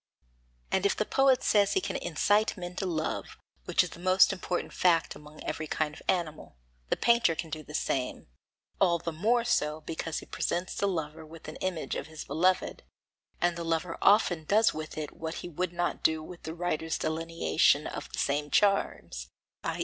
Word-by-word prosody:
And 190 - +2
if 200 - +3
the 215 - +1
poet 270 0 +3
says 205 -1 +4
he - - +3
can - - -4
incite 205 +7 +1
men 175 0 -6
to 190 - -1
love, 160 -3 -3 0.3
which - - +3
is - - -6
the - - -11
most 185 +1 +5
important 180 -1 -3
fact 170 -2 +3
among 150 +1 -12
every 155 - -3
kind 150 0 -1
of - - -12
animal, 155 - -2 0.3
the - - +1
painter 235 -8 +4
can 160 0 -5
do 155 0 -4
the 150 0 -9
same, 130 -4 -1 0.5
all 175 -3 +4
the 170 0 -4
more 225 +9 +2
so 155 -10 0
because 160 +1 -4
he - - -6
presents 175 +1 -2
the 200 - 0
lover 160 -4 -3
with 160 +1 -12
the 155 - -7
image 185 -4 -2
of - - -4
his 160 -1 -8
beloved; 180 +6 +1 0.6
and 175 0 +2
the 170 - -4
lover 165 +1 -1
often 195 -5 +4
does 215 +6 +4
with 155 0 -6
it 155 -1 -4
what 160 0 -5
he - - -4
would 175 +1 -2
not 175 0 -2
do 160 -1 +2
with 175 +2 -10
the 160 +1 -6
writer's 165 -2 -1
delineation 160 -2 +2
of - - -6
the - - -7
same 145 +1 0
charms, 170 - +1 0.3
i. - - -2
165 Hz, 195 wpm, -29 LUFS, 155-185 Hz, 0.6 s, most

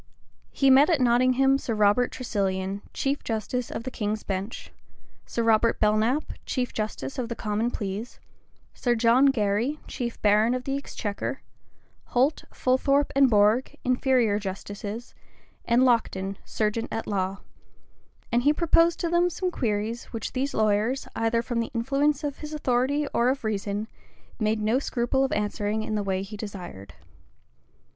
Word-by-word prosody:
He 275 -1 +3
met 275 +5 +7
at 330 -5 +3
Nottingham 255 +2 +3
Sir 230 - -3
Robert 210 +4 +3
Tresilian, 195 -4 -2
chief 280 +1 -2
justice 230 +2 -2
of - - -5
the 260 - -5
king's 215 -1 -3
bench, 195 +3 -5 0.6
Sir 235 - -1
Robert 225 0 +3
Belknappe, 220 +7 +1
chief 250 -2 -2
justice 220 +5 -4
of 240 -2 -3
the 235 - -3
common 215 +1 -1
pleas, 210 +1 -5 0.5
Sir 240 -1 0
John 235 +4 +5
Gary, 230 +3 +1
chief 235 -3 -4
baron 215 +3 +4
of 255 - -4
the 270 +1 -2
exchequer, 220 -7 -4 0.6
Holt, 265 +5 +1
Fulthorpe, 275 +3 +2
and 275 -1 +6
Bourg, 215 +3 +3
inferior 250 -4 +2
justices, 205 +3 -6 0.5
and 240 +2 +4
Lockton, 200 -6 +1
serjeant 220 +2 -1
at 225 - -3
law; 195 -1 -2 0.9
and 240 +1 +3
he 285 +4 +4
proposed 335 +1 +3
to 340 - 0
them 345 +1 +3
some 365 +2 -2
queries, 225 -3 -2
which 225 -2 -6
these 270 +2 -2
lawyers, 215 +4 +1
either 225 +1 +1
from 240 -1 -2
the 230 - -2
influence 275 +5 +1
of 290 -2 -3
his 305 0 -6
authority 275 +1 +1
or 240 +1 +3
of 270 0 -1
reason, 205 0 -2 0.5
made 215 0 +1
no 225 +5 +2
scruple 265 0 0
of 270 - 0
answering 210 +1 -1
in 215 - -4
the 210 - 0
way 190 -1 -1
he 205 +2 -8
desired. 185 - -8
235 Hz, 150 wpm, -26 LUFS, 210-265 Hz, 0.9 s, met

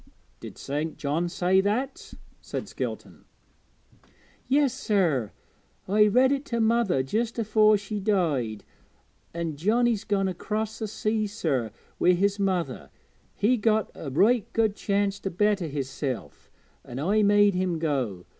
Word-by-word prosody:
'Did - - -10
St. 150 +3 -4
John 155 +4 -1
say 185 +2 +2
that?' 230 +8 -3 0.3
said - - -5
Skelton. - - -6 1.2
'Yes, 275 -2 +3
sir, 165 - 0 0.6
I 210 +2 +4
read 255 +5 +4
it 280 0 0
to 235 - -2
mother 225 - +2
just 225 - -2
afore 215 -1 +4
she 205 +1 -5
died. 155 - 0 0.7
An' 165 -3 -4
Johnnie's 225 +5 +1
gone 195 -2 0
across 215 +4 -3
the 220 - -3
sea, 215 +1 -1
sir, 150 - -1 0.3
wi' 180 - +5
his 200 +3 +1
mother; 190 -4 -1 0.5
he 240 +5 +2
got 220 -1 +1
a 145 - -7
right 210 - +2
good 220 -3 +1
chance 200 -1 -1
to 195 - -3
better 200 -1 +1
hisself, 135 -2 -5 0.3
an' 120 - -9
I 195 +10 +2
made 205 0 +4
him 180 -2 -1
go. 130 - -2
200 Hz, 135 wpm, -26 LUFS, 160-215 Hz, 1.2 s, wi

